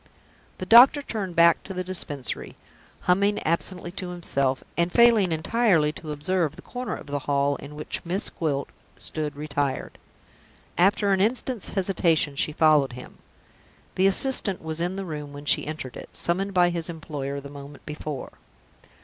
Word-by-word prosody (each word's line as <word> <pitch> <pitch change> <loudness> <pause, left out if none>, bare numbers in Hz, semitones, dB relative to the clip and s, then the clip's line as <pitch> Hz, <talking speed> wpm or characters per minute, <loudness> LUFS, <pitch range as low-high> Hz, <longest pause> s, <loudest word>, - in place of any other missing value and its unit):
The 185 - -5
doctor 250 +7 +8
turned 195 -8 -4
back 170 0 +5
to 190 - -8
the 185 - -2
Dispensary, 150 - -4 0.5
humming 200 +3 +2
absently 175 +2 -2
to 185 -1 -6
himself, 140 -7 -1
and 170 +1 +1
failing 230 -6 +5
entirely 165 -2 +2
to 155 0 -8
observe 155 +1 -1
the - - -13
corner 250 0 -5
of - - -10
the 145 0 -3
hall 140 0 +2
in 145 +1 -10
which 150 - -5
Miss 180 +4 -2
Gwilt 145 -4 -2 0.3
stood 150 -2 -4
retired. 145 -2 -3 0.8
After 200 +2 +3
an 190 - +1
instant's 240 +1 0
hesitation, 170 -6 +1
she 155 - +1
followed 150 -4 +3
him. 125 +1 -11 0.7
The 190 +1 +3
assistant 195 -3 +3
was 160 +1 -2
in 180 +2 -1
the 195 0 -4
room 150 -4 -6
when 145 +1 -9
she - - +2
entered 150 -5 -6
it - - -9
summoned 190 +3 0
by 175 -1 +4
his 170 -1 -3
employer 145 -4 -5
the 140 0 -10
moment 140 0 -11
before. 150 -2 -6
170 Hz, 160 wpm, -25 LUFS, 145-190 Hz, 0.8 s, doctor